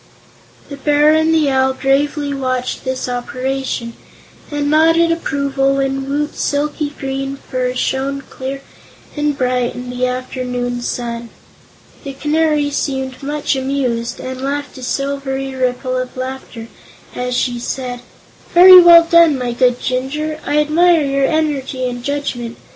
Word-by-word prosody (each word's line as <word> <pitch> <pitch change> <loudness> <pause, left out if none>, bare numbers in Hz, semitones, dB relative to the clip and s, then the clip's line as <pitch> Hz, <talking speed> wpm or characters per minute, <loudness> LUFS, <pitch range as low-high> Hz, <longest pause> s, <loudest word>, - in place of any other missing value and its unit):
The 280 - -8
Bear 295 +2 +3
and 315 +1 +3
the 310 -3 +2
Owl 265 0 +2
gravely 285 +2 0
watched 255 -2 -2
this 260 0 -2
operation 255 -1 -3 0.6
and 290 -1 -2
nodded 330 +2 +4
approval 275 -4 0
when 270 0 -1
Woot's 295 +1 -2
silky 295 +1 -1
green 270 0 -3
fur 255 -2 -3
shone 270 +2 -1
clear 270 +1 -7 0.5
and 295 -1 -1
bright 250 -2 0
in 250 0 -6
the 250 0 -1
afternoon 250 -1 -3
sun. 235 -1 -4 0.7
The 275 -2 -6
Canary 300 +1 +1
seemed 265 -2 -3
much 290 0 -1
amused 260 -3 -2
and 260 0 -6
laughed 285 +1 -3
a - - -10
silvery 270 0 -3
ripple 255 0 -1
of 255 0 -5
laughter 255 -3 -6 0.5
as 250 0 -2
she 245 -2 -1
said: 250 0 -4 0.6
"Very 365 +1 +10
well 340 -1 +9
done, 335 -3 +5
my 250 -1 -2
good 245 0 +2
Jinjur; 300 +5 -2
I 295 - 0
admire 320 +2 +4
your 275 -1 +1
energy 280 -5 -1
and 245 -1 -5
judgment. 245 -4 -3
270 Hz, 135 wpm, -17 LUFS, 255-290 Hz, 0.7 s, Very